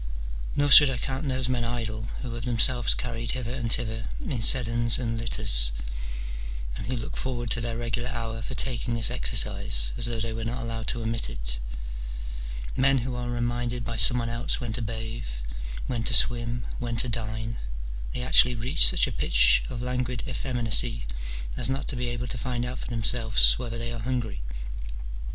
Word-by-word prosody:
Nor 145 0 +1
should 145 0 +11
I 130 - -3
count 135 +4 -3
those 130 -2 -2
men 125 -2 -1
idle 115 -2 -4 0.2
who 120 -2 -6
have 115 0 -7
themselves 120 0 +5
carried 115 -1 -4
hither 125 -2 -5
and 120 -3 -3
thither 115 -2 -1
in 160 - -4
sedans 120 0 +6
and 115 -2 -3
litters, - - +3 1.0
and 100 - -7
who 130 - -2
look 115 - -6
forward 120 -3 -4
to 120 - +2
their 115 0 -3
regular 120 +1 -3
hour 115 -1 -5
for 130 - -6
taking 120 -2 0
this 115 -1 +5
exercise - - +2
as 120 - -2
though 115 -1 -4
they 115 0 -3
were 115 0 -5
not 120 +3 -4
allowed 115 -1 -5
to 120 - -3
omit 115 - -2
it: - - -3 1.2
men 135 +1 +3
who 130 - -4
are 125 0 -4
reminded 120 0 -3
by 115 - -5
some 125 +2 +5
one 120 -1 -2
else 115 +2 -1
when 120 -3 -5
to 120 - -1
bathe, 110 - -6 0.6
when 120 -3 -3
to 115 - +7
swim, 120 +1 +4
when 120 -1 -4
to 125 - +1
dine: 110 0 -4 0.5
they 125 - -5
actually 125 -1 +4
reach 115 - +4
such - - +3
a - - -5
pitch - - +3
of 120 - -6
languid 125 -1 -3
effeminacy 120 - +2 0.5
as - - 0
not 135 +1 -3
to - - -1
be 125 0 -3
able 120 0 -4
to 120 0 -4
find 125 0 -3
out 125 +1 -6
for - - -7
them 115 -2 -4
selves 115 -1 +5
whether 120 -2 -5
they 120 0 -5
are 120 - -6
hungry. 115 - -4
120 Hz, 190 wpm, -26 LUFS, 115-125 Hz, 1.2 s, should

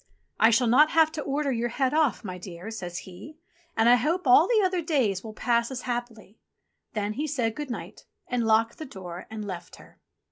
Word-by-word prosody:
"I 225 - +6
shall 235 +2 +3
not 270 +7 +5
have 320 -1 +4
to 315 - -4
order 285 0 -1
your 240 -1 -1
head 260 +2 0
ofi", 310 -6 +2
my 185 -3 -6
dear," 180 +3 -8
says 175 -5 -6
he. 195 - -10 0.4
"And 225 +1 +4
I 245 +1 +7
hope 325 +9 -1
all 275 +7 +6
the 440 -2 +3
other 365 -1 0
days 255 - 0
will 220 -1 -9
pass 235 0 +1
as 260 -2 -5
happily." 240 -4 -5 0.5
Then 210 -1 -2
he 295 +7 -3
said 245 -6 -1
good 295 -2 -5
night 240 - -7 0.2
and 240 -3 -1
locked 225 +1 +2
the 315 - -5
door 180 -6 -9
and 215 -1 -6
left 180 -3 -7
her. - - -18
240 Hz, 210 wpm, -26 LUFS, 215-295 Hz, 0.5 s, I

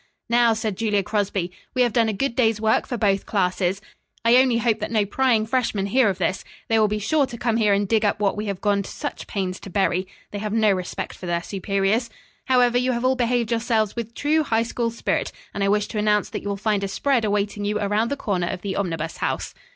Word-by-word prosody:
"Now," 235 -1 +5
said 215 -3 -3
Julia 210 -3 +1
Crosby, 195 -3 -1 0.2
"we 255 - +4
have 240 -3 0
done 230 -2 +3
a - - -1
good 235 +4 -1
day's 225 -4 +2
work 220 0 +2
for 245 - -3
both 200 -3 +1
classes. 185 -1 0 0.4
I 235 +2 +6
only 255 -2 +4
hope 225 -1 +1
that 215 - -3
no 215 -3 +2
prying 230 0 +2
freshmen 225 -5 0
hear 230 +2 +3
of 190 - -2
this. 185 +1 -1 0.3
They 225 -1 +3
will 215 - +4
be 210 +1 -1
sure 280 +7 +1
to 235 - -8
come 230 -1 0
here 215 -3 +3
and 200 0 +1
dig 220 +1 +2
up 205 - +1
what 200 -2 +1
we 210 +1 -4
have 200 -2 -4
gone 205 -1 +2
to 195 - -8
such - - -6
pains 185 -2 -3
to - - -10
bury. 185 -1 0 0.2
They 205 - -4
have 210 0 -3
no 220 -2 +4
respect 185 -2 -3
for 180 - -8
their 170 0 -1
superiors. 200 +5 0 0.4
However, 245 -2 +3
you 255 +1 +1
have 235 +1 -2
all 260 +1 +3
behaved 240 -2 0
yourselves 225 -2 +1
with 235 -1 -5
true 310 +2 +2
High 230 -6 +1
School 235 0 -2
spirit, 230 - -2 0.2
and 200 - -2
I 195 - +2
wish 210 0 +2
to 215 - -3
announce 210 0 +2
that - - -4
you 205 - -5
will 200 - -2
find 205 0 0
a - - 0
spread 250 +4 +1
awaiting 205 0 -1
you 210 +1 0
around 210 +3 +1
the 280 - -2
corner 185 -9 -1
of 180 0 -5
the 195 -2 -3
Omnibus 165 -4 -3
House." - - -2
215 Hz, 245 wpm, -23 LUFS, 200-235 Hz, 0.4 s, I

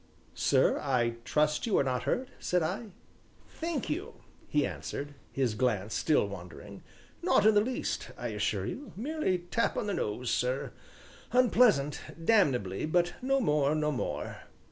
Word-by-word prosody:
"Sir, - - +3
I 120 -4 0
trust 150 +7 +1
you 215 - +2
are - - +4
not 125 -2 -1
hurt?" 255 0 0
said 180 -2 +1
I. 190 +8 -2 0.6
"Thank 325 -5 -3
you," 350 +7 -3 0.3
he 150 -1 +2
answered, 145 +1 -5 0.2
his 130 -5 0
glance 110 -3 0
still 150 -9 +2
wandering, 90 -5 -9 0.4
"not - - +3
in 220 - +7
the 205 - +5
least 250 +4 -2
assure - - -1
you 290 - -6
merely 255 - 0
tap 175 +7 -1
on - - -1
the 205 - -1
nose, 115 - -2
sir 125 +2 0 0.6
unpleasant 230 - +4 0.2
damnably, 135 - +2
but 175 +2 +2
no 270 +2 +2
more, 150 - +2
no 150 -1 +1
more." 130 - -3
155 Hz, 145 wpm, -30 LUFS, -, 0.6 s, in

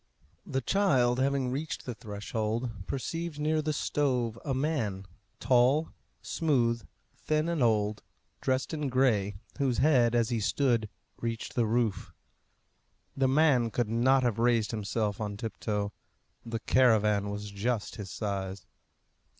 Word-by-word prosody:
The 135 - -1
child 130 -9 +2
having 135 -1 +1
reached 150 +4 -4
the 125 - -4
threshold, 110 -1 -4
perceived 165 +4 -3
near 155 +1 +1
the 155 0 -1
stove 125 -6 0
a 140 - -3
man, 130 -9 -1 0.3
tall, 130 +5 +3 0.3
smooth, 120 - 0 0.3
thin 155 +1 0
and 170 -4 -1
old, 105 -3 +2 0.4
dressed 130 +3 0
in 150 -3 -2
gray, 115 -7 +2 0.2
whose 130 -4 +1
head, 125 -5 +4
as 115 -2 +2
he 120 - 0
stood, 115 -1 +1 0.3
reached 115 -1 -4
the 120 -3 +1
roof. 115 -2 0 1.0
The 135 -1 +2
man 135 -4 +4
could 115 -1 -1
not 130 +4 +3
have 120 -3 0
raised 115 -2 +2
himself 105 -1 -2
on 105 -1 -3
tiptoe. 105 -2 -3 0.5
The 115 -1 -4
caravan 105 -5 +3
was 105 0 -5
just 105 +2 -2
his 100 -3 -6
size. 95 -3 -4
120 Hz, 135 wpm, -29 LUFS, 105-135 Hz, 1.0 s, head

